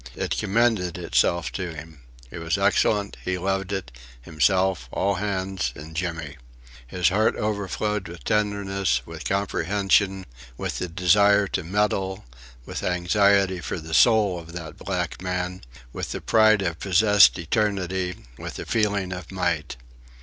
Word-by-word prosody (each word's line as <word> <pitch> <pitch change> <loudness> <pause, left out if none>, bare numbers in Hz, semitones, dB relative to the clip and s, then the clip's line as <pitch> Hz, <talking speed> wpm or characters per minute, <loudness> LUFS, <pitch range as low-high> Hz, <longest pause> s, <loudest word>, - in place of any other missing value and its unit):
It - - -2
commended 105 -4 +1
itself 85 0 +1
to 90 -4 -5
him. 75 0 -10 0.3
It 85 - -7
was 80 -1 -1
excellent; 100 -1 +1
he 90 0 -1
loved 95 +1 -2
it, 95 -10 -4 0.3
himself, 85 +1 +1
all 100 - +1
hands, 95 -7 -2
and 80 +2 -10
Jimmy. 80 -4 -4 0.5
His 90 +6 +1
heart 105 +4 +2
overflowed 105 -1 -2
with 85 -5 -10
tenderness, 100 - 0
with - - -9
comprehension, 95 0 +1 0.3
with - - -3
the 90 - -2
desire 100 +4 +4
to - - -2
meddle, 95 0 -1 0.4
with - - -5
anxiety 95 +1 +2
for 90 - -4
the 80 0 -8
soul 105 -1 +4
of 85 0 -12
that 85 -3 -7
black 90 -3 -3
man, 90 0 -3 0.3
with - - -4
the - - -4
pride 110 -2 +4
of 85 -3 -2
possessed 100 +2 +5
eternity, 95 -1 -1
with - - -7
the - - -6
feeling 100 -4 0
of 90 -1 -8
might. 85 -7 -2
95 Hz, 140 wpm, -24 LUFS, 85-100 Hz, 0.5 s, possessed